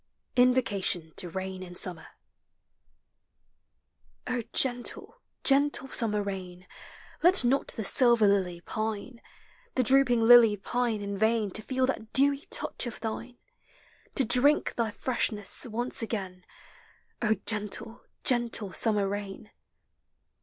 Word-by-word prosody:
INVOCATION 205 -10 +1
TO 180 - -4
KAIX 190 +1 -6
IX 180 -1 -2
BUMMER 175 -3 -9 2.2
O 250 - -2
GENTLE, 255 - 0 0.2
gentle 275 -1 +2
summer 210 -5 -1
ruin, 185 -2 -7 0.6
Let 355 -5 +7
not 265 +3 +1
the 220 - -3
silver 235 +1 +4
lily 185 -4 0
pine, 220 +4 -5 0.5
The 255 - +2
drooping 250 -2 +4
lily 230 -3 +7
pine 235 +1 -2
in 200 -1 -5
vain 220 -2 +1
To 215 - -1
feel 260 +3 -1
thai 255 -4 -4
dewy 280 +1 +2
tOUCh - - -2
of 235 - -7
thine, 235 +2 -6 0.4
— - - -31
To 265 - +3
drink 260 +6 +3
thy 230 -2 -2
freshness 210 -1 -2
once 240 +3 0
again, 190 -5 -5 0.8
O 220 -2 +2
gentle, 215 +2 -3 0.2
gentle 235 -5 +1
summer 210 -3 +1
rain 200 +1 -7
225 Hz, 120 wpm, -27 LUFS, 200-250 Hz, 2.2 s, Let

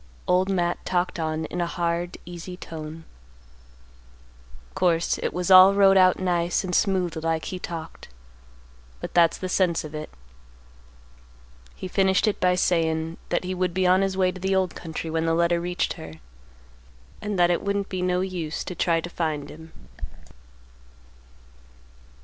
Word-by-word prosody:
Old 185 +2 +2
Matt 175 -2 -1
talked 180 -1 -1
on 160 0 -2
in 175 +3 -4
a 170 - 0
hard 170 0 -2
easy 175 +1 -8
tone. 160 -1 -8 1.7
"Course 170 -2 +1
it - - -2
was 180 +1 -2
all 185 +1 +9
wrote 195 -1 +6
out 185 -1 +5
nice 175 -1 0
and 185 -1 -4
smooth 185 -3 +1
like 160 0 -1
he 185 - -5
talked, 165 -2 -7 0.9
but - - -7
that's 170 -1 +4
the 185 - -4
sense 180 -2 +1
of 155 0 -9
it. 155 0 -6 1.7
He - - -6
finished 190 +2 +2
it 210 - 0
by 180 0 +3
sayin' 165 -2 0
that - - 0
he 185 +1 -3
would 180 -1 -1
be 185 0 +1
on 185 +1 +4
his 195 -1 -1
way 185 -1 +2
to 185 - -11
the 190 +1 +1
old 185 -1 +1
country 160 -1 -6
when 165 0 0
the 165 - +2
letter 170 0 +2
reached 175 +1 -1
her, 80 - -10 1.1
and 205 -1 -3
that 175 0 +4
it 175 - 0
wouldn't 200 0 -1
be 185 -1 -3
no 180 0 +1
use 175 -5 -4
to - - -6
try 170 -2 +1
to 175 - -6
find 155 -4 -3
him. 160 +1 -12
175 Hz, 160 wpm, -25 LUFS, 165-185 Hz, 1.7 s, all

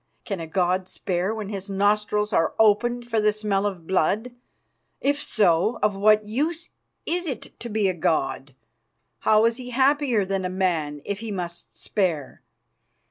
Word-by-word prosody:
Can 195 -4 -3
a 165 - -5
god 180 +2 0
spare 185 +1 -2
when 215 -3 -5
his 200 -1 -6
nostrils 210 +1 +1
are 165 - +2
opened 240 +3 +3
for 230 -2 0
the 210 0 +4
smell 205 -1 0
of 180 -5 -6
blood? 195 +7 +1 0.7
If 285 +1 0
so, 195 0 +2
of 210 -1 +2
what 215 +1 +4
use 310 +9 -2 0.3
is 350 +1 -1
it 270 - -6
to 235 - -6
be 215 -2 +1
a 185 - +1
god? 140 -5 -1 0.6
How 215 +1 +4
is 230 0 +2
he 250 -1 -8
happier 265 -4 +2
than 195 0 -2
a 180 - -1
man 165 -6 -1
if 200 0 -3
he 225 0 -6
must 175 -4 -6
spare? 170 - -2
205 Hz, 165 wpm, -24 LUFS, 185-225 Hz, 0.7 s, the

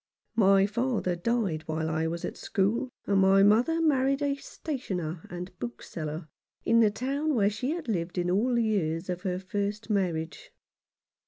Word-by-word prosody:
My 195 -3 +5
father 215 -3 0
died 195 -4 0
while 160 0 -1
I 160 0 0
was 170 +1 -3
at - - -5
school, 215 +6 0 0.2
and 200 -1 +2
my 195 +1 +6
mother 235 +11 +4
married 275 -3 +2
a 285 -1 +2
stationer 185 - -5
and 180 +1 -7
bookseller 155 +6 -5 0.4
in 230 - +4
the 220 -2 +6
town 275 +7 -1
where 205 -3 +3
she 220 +5 -3
had 330 -2 -3
lived 175 -5 -2
in 180 0 +1
all 235 +7 +2
the 235 - +3
years 175 -6 0
of 180 0 -4
her 180 -2 -1
first 205 +3 -3
marriage. 175 - -1
200 Hz, 165 wpm, -28 LUFS, 175-240 Hz, 0.4 s, my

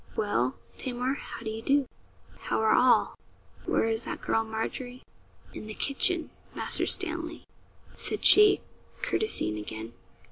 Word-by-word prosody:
'Well, 130 - 0 0.2
Tamar, 250 +1 -2
how 285 - -8
do 220 - -3
you 220 +1 -6
do? 275 +2 +2 0.5
how - - -2
are 220 0 +3
all? 250 0 +4 0.5
Where - - +2
is 225 +1 0
that - - -5
girl 225 - +1
Margery?' 235 +3 -5 0.5
'In 215 - -8
the 215 - -7
kitchen, 330 +5 0 0.2
Master - - 0
Stanley,' 330 -3 0 0.5
said - - -3
she, 415 -1 +8 0.4
courtesying 105 - 0
again. 110 +2 -7
245 Hz, 135 wpm, -28 LUFS, 220-285 Hz, 0.5 s, she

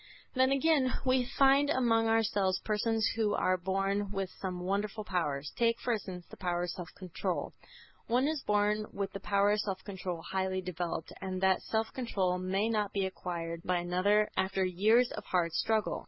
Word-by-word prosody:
Then, 260 0 +3
again, 275 -2 +3
we 255 -1 +2
find 275 +1 +5
among 230 -5 +3
ourselves 205 -4 +2
persons 220 +1 +1
who 215 -2 +1
are 185 - +2
born 195 +2 -1
with 195 -2 -3
some 180 -2 -5
wonderful 200 +3 -2
powers. 150 -7 -2
Take, 230 0 +2
for 245 - 0
instance, 185 -5 -5
the - - -10
power 175 -1 -1
of 175 - -2
self 180 -1 -7
control. 185 -4 -3 0.5
One 250 +4 +2
is 310 -2 -1
born 210 0 +1
with 200 -1 -3
the 195 - -6
power 200 +1 +2
of 210 - +2
self 195 -3 -3
control 185 -4 -5
highly 190 0 -1
developed, 175 -2 -4
and 190 -1 -3
that 190 -1 +3
self 220 0 -2
control 190 -8 -1
may 190 +3 0
not 210 -3 0
be 195 -1 +1
acquired 170 -3 -4
by 180 0 +1
another 185 +5 +2
after 190 0 +1
years 215 +7 +3
of - - -6
hard 175 -2 +1
struggle. 220 +5 0
200 Hz, 180 wpm, -31 LUFS, 185-225 Hz, 0.5 s, find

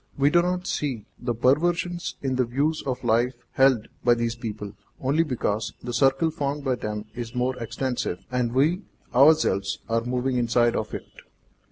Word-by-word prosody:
We 140 +1 +4
do 175 - +5
not 180 +1 -1
see 130 -8 -2
the 120 -1 -2
perversion 170 +8 +2 0.2
in 130 -1 0
the 130 - +3
views 140 +6 0
of 130 -1 -2
life 120 +2 +2 0.2
held 130 -5 +3 0.2
by 120 -1 +5
these 115 0 -1
people, 105 -4 -6 0.3
only 140 +5 +2
because 120 -7 -1
the 120 - -4
circle 135 +6 +3
formed 145 -2 -3
by 135 -2 +1
them 105 -3 -4
is 120 0 -6
more 125 +1 0
extensive, 115 -6 -3
and 125 -2 0
we 150 - +2 0.3
ourselves 125 -9 +4
are 115 0 +1
moving 125 +1 -1
inside 120 0 +2
of 110 - -3
it. - - -6
125 Hz, 170 wpm, -25 LUFS, 115-140 Hz, 0.3 s, do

